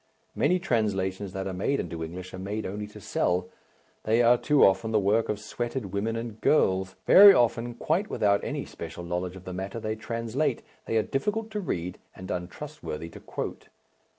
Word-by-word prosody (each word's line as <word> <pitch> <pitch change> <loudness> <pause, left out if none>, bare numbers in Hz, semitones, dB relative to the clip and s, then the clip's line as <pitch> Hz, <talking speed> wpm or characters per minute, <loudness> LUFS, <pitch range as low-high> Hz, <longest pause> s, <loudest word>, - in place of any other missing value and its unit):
Many 180 - +3
translations 100 - -1
that 95 0 -3
are 95 - -3
made 100 +10 0
into 80 -1 -4
English 90 +3 -7
are 95 - -6
made 105 +3 -4
only 105 +2 -4
to 105 - -12
sell, 90 +1 0 0.5
they 115 +2 +3
are 120 +1 +7
too 145 +3 +4
often 95 +4 +2
the 110 -1 +3
work 105 +3 +2
of 105 - -1
sweated 120 -1 -4
women 110 +3 -1
and 115 -1 -6
girls 95 -9 +2
very 200 0 +10
often 120 0 +1
quite 175 - 0
without 100 -1 +2
any - - -3
special 85 +1 -8
knowledge 90 +1 -3
of 95 0 -11
the 95 - -5
matter 95 +4 -4
they 110 0 -2
translate 115 +6 -2 0.2
they 115 - +1
are 110 - +3
difficult 210 - -2
to 210 - -2
read 90 - -3 0.2
and 95 +1 -7
untrustworthy 90 - -6
to - - -11
quote. - - -6
105 Hz, 185 wpm, -27 LUFS, 95-120 Hz, 0.5 s, very